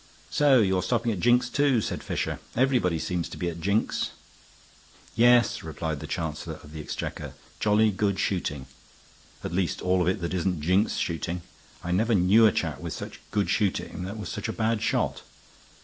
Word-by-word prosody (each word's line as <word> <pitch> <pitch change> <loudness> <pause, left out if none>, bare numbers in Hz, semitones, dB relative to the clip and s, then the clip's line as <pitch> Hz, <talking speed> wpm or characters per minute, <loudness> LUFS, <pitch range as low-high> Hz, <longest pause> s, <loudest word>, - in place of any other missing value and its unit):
"So 140 -4 +5
you're 95 -2 +2
stopping 115 +5 0
at 100 - -3
Jink's, 120 +3 +4
too," 140 -2 +2
said - - -3
Fisher. - - -3 0.2
"Everybody 120 -9 +2
seems 85 +1 -2
to - - -8
be 90 - -1
at 85 0 -7
Jink's." 100 +5 0 1.1
"Yes," 120 0 +4
replied 80 -1 -4
the - - -7
Chancellor 80 0 -4
of 75 - -13
the 80 0 -6
Exchequer. - - -5 0.2
"Jolly 105 +1 +3
good 100 0 0
shooting. 75 -8 -2 0.8
At - - -4
least 90 -3 0
all 90 0 +1
of 90 - +1
it 95 +3 +1
that 85 +1 -3
isn't 90 -1 0
Jink's 90 +7 +2
shooting. 85 +1 -2 0.4
I 90 - -3
never 110 +5 +2
knew 100 +5 +6
a - - +4
chap - - -2
with - - -5
such - - -7
good 105 -2 0
shooting 100 -4 -1
that 100 +4 -6
was 105 - -6
such - - -4
a 110 - -3
bad 110 -1 0
shot. 115 - 0
95 Hz, 180 wpm, -27 LUFS, 85-115 Hz, 1.1 s, knew